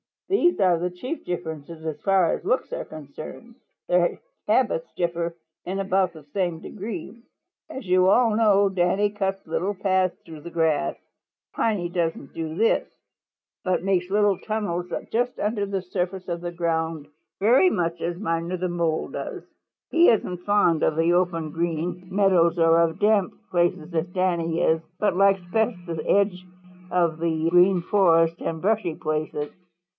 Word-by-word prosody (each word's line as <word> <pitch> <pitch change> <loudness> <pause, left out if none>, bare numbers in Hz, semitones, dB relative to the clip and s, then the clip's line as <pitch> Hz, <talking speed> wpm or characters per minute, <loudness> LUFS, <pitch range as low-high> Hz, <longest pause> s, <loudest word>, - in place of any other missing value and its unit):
"These 350 - +3
are 180 -3 +4
the 180 +1 -1
chief 250 - -6
differences 160 -2 -6
as 160 -2 -4
far 195 -3 +3
as - - -5
looks 485 +4 0
are - - -4
concerned. 155 - -10 0.3
Their 175 -1 +2 0.3
habits - - +1
differ 170 -1 -2 0.3
in 190 +2 -3
about 190 -2 +1
the 155 -2 -12
same 175 +2 -2
degree. 205 +3 -7 0.5
As 265 -4 -7
you 185 0 +4
all 225 +3 +4
know, 205 -3 +4
Danny 190 +2 +1
cuts 195 -2 -3
little 190 +5 -2
paths 185 -1 +1
through 160 -2 -10
the 170 - -8
grass. 165 -1 +1 0.6
Piney 200 -6 0
doesn't 165 -5 -2
do 160 -1 -4
this, 225 +5 +2 0.8
but 185 -1 0
makes 185 -2 0
little 205 -1 +2
tunnels 190 -5 -3 0.2
just 245 +2 0
under 210 -1 -1
the 195 -1 -2
surface 180 +1 -4
of 170 -1 -3
the 175 0 -4
ground 165 -3 -2 0.3
very 250 - +5
much 170 - -1
as 170 0 -2
Miner 170 -1 -2
the 180 0 -2
Mole 170 -2 -1
does. - - -6 0.5
He 335 +1 +6
isn't 185 -5 +1
fond 205 -6 +3
of 155 - +2
the 165 +2 +2
open 170 -3 0
Green 170 +2 -3
Meadows 185 -4 +3
or 165 0 +5
of 165 -1 +1
damp 210 -3 +3 0.2
places 175 -1 0
as 165 +1 0
Danny 170 -2 0
is, 160 0 +2 0.2
but 205 -4 +1
likes 195 0 +4
best 220 +2 +1
the 165 -3 -4
edge 195 -2 +2 0.5
of 170 -3 +1
the 165 -1 0
Green 180 +1 +5
Forest 165 -3 +3
and 160 -1 -3
brushy 200 -5 0
places. 155 -1 -3
180 Hz, 160 wpm, -24 LUFS, 165-195 Hz, 0.8 s, He